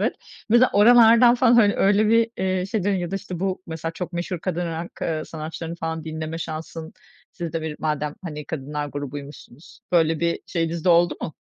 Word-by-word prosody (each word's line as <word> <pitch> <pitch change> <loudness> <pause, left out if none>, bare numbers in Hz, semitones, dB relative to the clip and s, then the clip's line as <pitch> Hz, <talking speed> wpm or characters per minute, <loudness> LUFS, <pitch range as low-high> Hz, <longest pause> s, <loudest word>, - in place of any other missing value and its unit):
evet. - - 0 0.3
Mesela 240 +3 +5
oralardan 235 +2 +7
falan 245 -1 +4
hani 210 -4 +5
öyle 205 +2 +3
bir, 230 0 +3
iii, 185 0 0
şey 195 -2 -2
deniyor 200 -2 +1
ya 175 0 -4
da 195 - -1
işte 185 -3 -7
bu, 190 -1 -2
mesela 165 0 -5
çok 180 +1 -6
meşhur 175 +1 -3
kadın 175 -1 -2
rock, 165 +1 -6
ııı, 155 -1 -2
sanatçılarını 160 +1 -6
falan 160 -1 -4
dinleme 160 0 -5
şansın, 160 0 -6 0.4
siz 170 -3 -6
de 165 -1 -3
bir 155 -1 -4
madem 150 -1 -2
hani 150 -4 -6
kadınlar 145 0 -4
grubuymuşsunuz, 145 0 -9
böyle 165 -2 +3
bir 170 0 0
şeyiniz 165 -1 -2
de - - +2
oldu 170 -1 +4
mu? 155 - -5
170 Hz, 195 wpm, -23 LUFS, 155-195 Hz, 0.4 s, oralardan